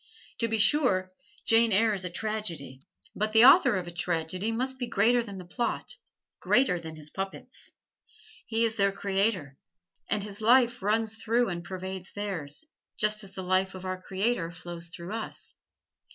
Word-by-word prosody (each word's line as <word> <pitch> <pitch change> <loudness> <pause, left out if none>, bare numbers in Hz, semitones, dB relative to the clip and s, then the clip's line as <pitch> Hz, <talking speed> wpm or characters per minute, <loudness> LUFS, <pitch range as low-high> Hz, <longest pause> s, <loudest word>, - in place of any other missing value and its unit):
To 230 - +1
be 225 0 0
sure, 205 -5 +3 0.3
"Jane 225 0 +4
Eyre" 215 +2 +4
is 190 -2 -3
a 180 - -3
tragedy, 170 -10 -4 0.3
but 215 +1 -1
the 225 +2 +8
author 275 - +7
of 185 -2 -2
a 175 - -7
tragedy 175 +4 -2
must 260 +3 -2
be 245 - -2
greater 235 +2 +3
than 200 -4 -8
the 180 - -8
plot 235 +7 -2 0.5
greater 245 -9 +3
than 160 -1 -8
his 155 -1 -8
puppets. 195 0 -5 0.8
He 230 0 +2
is 225 0 -1
their 200 -1 +3
creator, 195 -7 -1 0.5
and 210 -2 0
his 205 0 -7
life 245 +2 +4
runs 220 +2 0
through 230 +1 +1
and 170 -2 -4
pervades 190 +1 -7
theirs, 190 - -5 0.3
just 215 0 +3
as 195 -1 -10
the 190 - -6
life 185 +1 +1
of 185 0 -8
our 185 0 -4
Creator 190 -3 -1
flows 170 0 -8
through 170 +4 -8
us. 225 -1 -6
200 Hz, 170 wpm, -28 LUFS, 180-225 Hz, 0.8 s, the